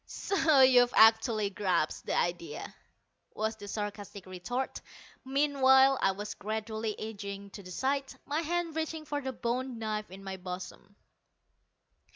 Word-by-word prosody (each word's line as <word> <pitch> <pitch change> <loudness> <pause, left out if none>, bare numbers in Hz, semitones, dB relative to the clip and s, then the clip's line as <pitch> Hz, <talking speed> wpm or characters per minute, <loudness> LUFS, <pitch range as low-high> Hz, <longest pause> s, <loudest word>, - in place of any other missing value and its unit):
"So 320 -8 +2
you've 250 -2 +6
actually 220 -2 +5
grasped 185 -6 -1
the - - 0
idea!" 170 -3 -2 0.6
was 220 +1 -1
the 205 -2 -10
sarcastic 205 -1 -5
retort. 190 +8 -4 0.4
Meanwhile 270 -1 +4
I - - +4
was 205 +1 -5
gradually 220 +1 -4
edging 200 -2 -6
to 200 - -9
the 185 - -12
side, 270 +8 -1
my 300 +3 -1
hand 335 0 -2
reaching 320 -1 -3
for 290 -1 -3
the 265 -1 -3
bone 250 +1 -3
knife 215 -1 -3
in 190 +2 -11
my 190 -1 -5
bosom. 185 +2 -8
220 Hz, 140 wpm, -30 LUFS, 200-265 Hz, 0.6 s, you've